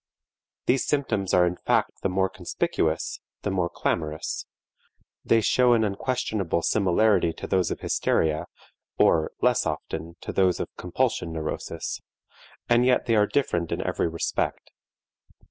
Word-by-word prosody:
These 130 +1 +2
symptoms 115 -10 0
are 90 -1 +5
in 90 +1 -1
fact - - 0
the 100 - 0
more 95 +1 +2
conspicuous, 80 -3 -2 0.2
the 100 - -1
more 90 -3 0
clamorous; 80 -2 -2 0.8
they 115 - +3
show 125 +2 +4
an 115 -2 +3
unquestionable 100 -5 -1
similarity 100 -3 +3
to - - -7
those 95 -3 +1
of - - -4
hysteria, 80 -1 +1 0.5
or 80 -1 +3
less - - +3
often 85 +1 -5
to - - -5
those 95 -3 +2
of - - -5
compulsion 85 - -1
neurosis, 80 -1 -4 0.7
and 120 0 +4
yet 125 0 +3
they 115 - +2
are 105 -1 +4
different 85 - 0
in - - -1
every - - 0
respect. 85 0 -2
95 Hz, 140 wpm, -26 LUFS, 85-110 Hz, 0.8 s, are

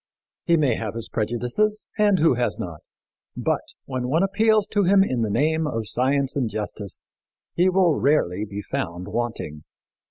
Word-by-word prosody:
He 170 -1 +4
may 140 -7 +2
have 110 -1 -4
his 115 - -4
prejudices 125 - -1
and 210 -3 +4
who 160 -4 +4
has 120 -6 -1
not? 85 -4 -6 0.6
but, - - 0 0.2
when 130 -2 -3
one 160 +8 +2
appeals 215 +1 +3
to 205 - +1
him 195 +1 +5
in 130 -11 -1
the 110 - 0
name 155 +7 +1
of 115 -6 -3
science 135 +3 0
and 130 -5 0
justice, 105 -2 -4 0.5
he 180 +2 +3
will 185 -3 +4
rarely 135 - +1
be 105 -1 -6
found 90 +1 -4
wanting. 105 -9 -3
130 Hz, 165 wpm, -24 LUFS, 110-175 Hz, 0.6 s, him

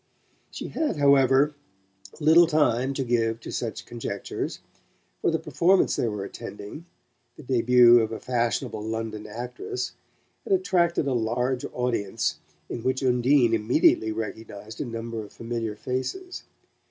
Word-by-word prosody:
She - - -7
had, 310 - -1
however, 140 0 +4 0.7
little 165 +2 +6
time 140 -4 +1
to 135 - -1
give 115 -2 0
to - - -7
such 115 -3 -4
conjectures, 115 -4 -5 0.6
for - - +2
the 165 - +1
performance 165 +5 +2
they 120 - 0
were 105 -3 -3
attending 105 - -9 0.5
the 155 - -12
debut 120 -1 +6
of 110 -1 -1
a 110 - -5
fashionable 120 -3 -1
London 110 -1 -4
actress 125 +2 -5 0.5
had 400 - 0
attracted 175 - +2
a 135 - 0
large 125 +2 -1
audience 120 -6 -1 0.3
in 120 - -5
which 130 +3 -1
Undine 125 -1 +3
immediately 110 0 +3
recognized 110 -1 -6
a - - -2
number 115 -1 -5
of 105 - -13
familiar 115 -2 -4
faces. 130 - -4
120 Hz, 135 wpm, -26 LUFS, 115-140 Hz, 0.7 s, little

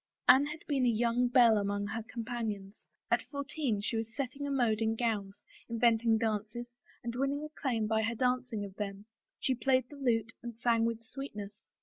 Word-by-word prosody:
Anne 265 +3 +7
had 305 +1 -6
been 275 -4 +1
a 245 - +5
young 235 +2 +2
belle 240 -3 +6
among 205 0 -1
her 220 +3 -3
companions; 220 -3 -4 0.3
at - - +4
fourteen 280 -5 -2
she 205 +3 -2
was 225 +1 -3
setting 275 +1 -3
a - - -2
mode 240 -6 +2
in 225 0 +2
gowns, 215 -4 -2 0.3
inventing 230 -1 +3
dances 220 +1 -2 0.4
and 235 -1 -3
winning 275 +3 0
acclaim 265 -7 -1
by 220 0 +2
her 225 +1 -1
dancing 250 -3 0
of 195 - -9
them; 200 -1 -4 0.3
she 260 - +1
played 255 0 +2
the - - -9
lute 230 -5 0
and 235 -2 -7
sang 230 -1 +3
with 230 0 -2
sweetness. 220 -5 -7
230 Hz, 185 wpm, -32 LUFS, 220-255 Hz, 0.4 s, Anne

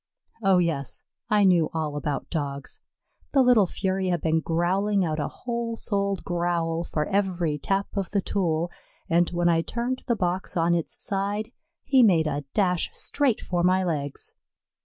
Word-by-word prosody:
Oh, 195 -3 +4
yes, 160 -7 -1 0.3
I 210 -2 +4
knew 175 -5 +4
all 155 -2 -2
about 145 -1 -3
Dogs. 140 -4 -3 0.5
The 270 -2 +5
little 240 -6 +5
fury 190 +1 -1
had 175 -1 +1
been 160 0 +2
growling 185 +5 +1
out 155 -1 -2
a 145 - -1
whole 235 -1 -4
souled 200 -3 -1
growl 170 -2 0
for 150 -2 -2
every 180 -6 0
tap 195 +5 0
of 195 -3 -2
the 205 - +1
tool, 175 -3 -1 0.4
and 170 +1 +4
when 175 0 0
I 165 -1 +4
turned 245 +7 -3
the 235 - +2
box 185 -2 -2
on 170 +1 +3
its 170 -2 -2
side, 205 +3 -2 0.3
he 265 -2 +4
made 175 -9 +5
a 145 -1 -2
dash 180 -4 +2
straight 280 -6 +1
for 175 -1 -1
my 185 +1 +3
legs. 145 -5 -2
180 Hz, 165 wpm, -26 LUFS, 165-200 Hz, 0.5 s, The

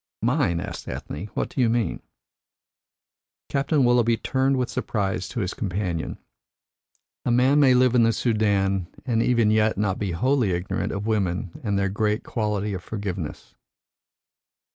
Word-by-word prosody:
"Mine?" 120 - +2
asked - - -6
Ethne. 80 +8 -6
"What - - -1
do 130 - -2
you 120 - +4
mean?" 115 -1 0 1.5
Captain 140 +1 +1
Willoughby 120 -2 +3
turned 135 +2 +1
with 125 -1 0
surprise 95 -6 -2
to 120 - -3
his 95 -1 -2
companion. 90 -6 -3 1.1
"A - - -1
man 130 +4 +4
may 130 -3 +6
live 125 -1 +4
in 125 - +5
the 115 0 +4
Soudan 100 -6 +1 0.2
and 115 -3 +1
even 115 -3 +3
yet 110 -1 +2
not 95 -2 0
be 100 -4 -2
wholly 125 +1 +1
ignorant 85 +2 -2
of 100 0 -4
women 95 -5 -1
and 100 -3 0
their 100 0 +1
great 105 +2 0
quality 105 -2 -2
of 95 -1 -5
forgiveness. 95 -8 -5
110 Hz, 150 wpm, -24 LUFS, 95-125 Hz, 1.5 s, may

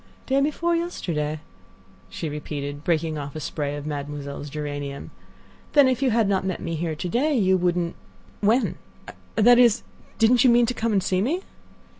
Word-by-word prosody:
"Day 270 +1 +2
before 330 +4 +1
yesterday," 155 - -2 0.7
she 160 - -5
repeated, 145 -1 -5
breaking 160 -2 0
off 140 0 -7
a - - -4
spray 145 0 -3
of 145 0 -6
Mademoiselle's 145 -1 -5
geranium; 145 -1 -5 0.6
"then 285 -2 +7
if 255 0 0
you 270 - +3
had 225 -2 +2
not 195 -1 +1
met 190 -2 -2
me 165 - -4
here 160 0 -2
to 165 - -4
day 270 - +1
you 190 -4 +3
wouldn't—when—that 205 +6 0
is, 240 -2 +5 0.3
didn't 235 +1 +4
you 260 - +6
mean 240 0 +5
to 245 - -1
come 230 -1 -1
and 195 -3 +2
see 185 0 +1
me?" 330 - -1
180 Hz, 165 wpm, -24 LUFS, 150-240 Hz, 0.7 s, then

